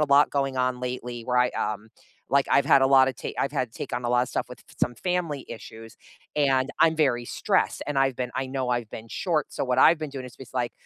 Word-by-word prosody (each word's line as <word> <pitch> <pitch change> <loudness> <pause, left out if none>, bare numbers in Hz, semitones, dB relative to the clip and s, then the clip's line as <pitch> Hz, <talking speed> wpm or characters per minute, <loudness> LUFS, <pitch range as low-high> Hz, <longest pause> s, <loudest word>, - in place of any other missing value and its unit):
a 150 - +3
lot 145 - +5
going 135 -2 -1
on 125 -1 0
lately 125 -1 -5
where 125 0 -1
I, - - -4
um 105 0 -3 0.5
like, 140 0 +3
I've 140 - +4
had 135 - +6
a - - +5
lotta 135 -1 +5
ta - - -4
I've 140 - -2
had 125 -3 -1
to - - -14
take - - -5
on 120 0 -3
a - - 0
lotta 125 +1 +3
stuff - - -2
with 125 - -9
f - - -23
f - - -19
some 120 - +2
family 170 -6 -1 0.2
issues, 115 0 -12 0.4
and 135 -3 +3
I'm 160 -1 +5
very 120 -2 -1
stressed, - - +1
and, 145 - -2
I've 135 -2 0
been 125 -1 -2
I - - -1
know 130 -1 -1
I've 120 -3 -1
been 115 +1 -9 0.2
short, 165 -5 +1
so, - - -1
what 125 0 0
I've 165 +4 +6
been 155 - -4
doing 130 -2 -5
is, 125 - -13
just, 130 - -12
like, 120 -2 -1
130 Hz, 265 wpm, -26 LUFS, 120-140 Hz, 0.5 s, had